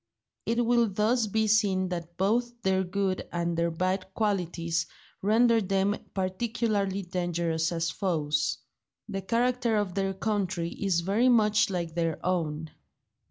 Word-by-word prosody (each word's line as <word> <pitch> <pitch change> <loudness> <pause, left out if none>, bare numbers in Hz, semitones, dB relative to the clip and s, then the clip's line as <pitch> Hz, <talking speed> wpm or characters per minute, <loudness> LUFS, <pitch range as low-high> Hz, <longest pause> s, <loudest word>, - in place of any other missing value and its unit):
It 235 +1 +1
will 235 -1 +3
thus 215 +4 +1
be 220 +2 +1
seen 200 -4 +2
that 170 -1 -6
both 235 +5 0
their 190 0 +2
good 190 0 -2
and 170 0 -1
their 170 0 +1
bad 185 +3 -2
qualities 175 -6 -1 0.3
render 225 +3 +4
them 195 +1 +1 0.2
particularly 200 0 -1
dangerous 170 -2 -1
as 165 -1 -1
foes. 150 -6 0 0.5
The 195 -3 -4
character 240 +3 +1
of 205 -3 -1
their 195 0 -1
country 190 -4 -1
is 190 -4 0
very 210 +8 +2
much 215 -4 +4
like 170 -4 -3
their 165 -2 -1
own. 160 -4 -1
190 Hz, 135 wpm, -28 LUFS, 170-215 Hz, 0.5 s, render